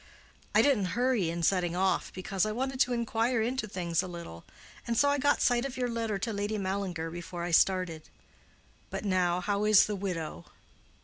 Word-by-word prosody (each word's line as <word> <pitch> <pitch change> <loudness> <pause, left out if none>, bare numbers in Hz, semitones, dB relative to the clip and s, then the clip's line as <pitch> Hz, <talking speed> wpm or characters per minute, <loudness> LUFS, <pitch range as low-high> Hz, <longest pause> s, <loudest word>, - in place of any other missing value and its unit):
"I - - +6
didn't 230 -9 +1
hurry 245 -8 +2
in 170 0 -3
setting 175 -1 +1
off, 190 +1 0
because 185 0 -2
I 215 - 0
wanted 260 +3 -3
to 250 - +3
inquire 235 +1 0
into 235 +1 -1
things 175 -4 -1
a 185 - -6
little, 170 - -9 0.4
and 235 -1 -1
so 285 - +4
I 285 0 +1
got 285 +2 +2
sight 245 -1 +3
of 270 -1 -5
your 250 -1 -1
letter 225 -3 -2
to 220 +3 -3
Lady 205 +1 -2
Mallinger 190 -4 -3
before 175 0 -6
I 175 - -3
started. 175 -2 +2 0.8
But - - -5
now, 180 -2 +1
how 200 +2 -1
is 210 -2 +6
the 210 - -3
widow?" 165 - -4
195 Hz, 190 wpm, -29 LUFS, 175-235 Hz, 0.8 s, I